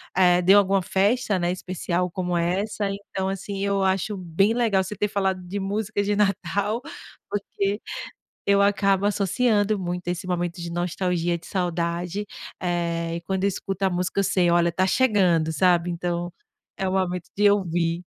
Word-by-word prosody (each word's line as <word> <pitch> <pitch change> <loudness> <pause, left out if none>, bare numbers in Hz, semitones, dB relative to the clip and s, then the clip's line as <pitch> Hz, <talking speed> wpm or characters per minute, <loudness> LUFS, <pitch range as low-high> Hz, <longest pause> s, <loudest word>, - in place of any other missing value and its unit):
eh, 180 -1 +5
de 190 +3 +6
alguma 195 -1 +4
festa 205 +3 +1
né, 175 0 0
especial 180 0 -2
como 180 0 -2
essa. 195 +5 -1 0.2
Então 190 0 -1
assim, 195 +1 -4
eu 200 -1 +1
acho 190 +2 0
bem 185 +4 +1
legal 220 -6 +2
você 190 +3 -6
ter 210 - 0
falado 190 -2 -1
de 185 +3 -4
músicas 205 +1 -2
de 205 - +2
Natal, 205 +2 0 0.5
porque 200 0 -2 0.7
eu 200 0 +4
acabo 200 -1 +2
associando 205 +1 +1
muito 180 -1 -4
esse 175 0 -3
momento 175 0 -2
de 170 0 -5
nostalgia, 175 0 -1
de 170 - -15
saudade, 175 +1 -2 0.4
eh, 170 -1 -1
e - - -4
quando 190 +2 -2
eu - - +4
escuto 195 0 -3
a 190 - +3
música, 180 +2 -1
eu - - +1
sei: 180 -2 +2
"Olha, 170 0 +3
tá 185 +3 +1
chegando", 185 -9 +3
sabe, 175 +1 +3
Então 175 0 -3 0.4
é 190 - -1
o - - -2
momento 180 -2 -1
de 205 0 +5
ouvir. 175 -3 0
190 Hz, 170 wpm, -24 LUFS, 175-200 Hz, 0.7 s, de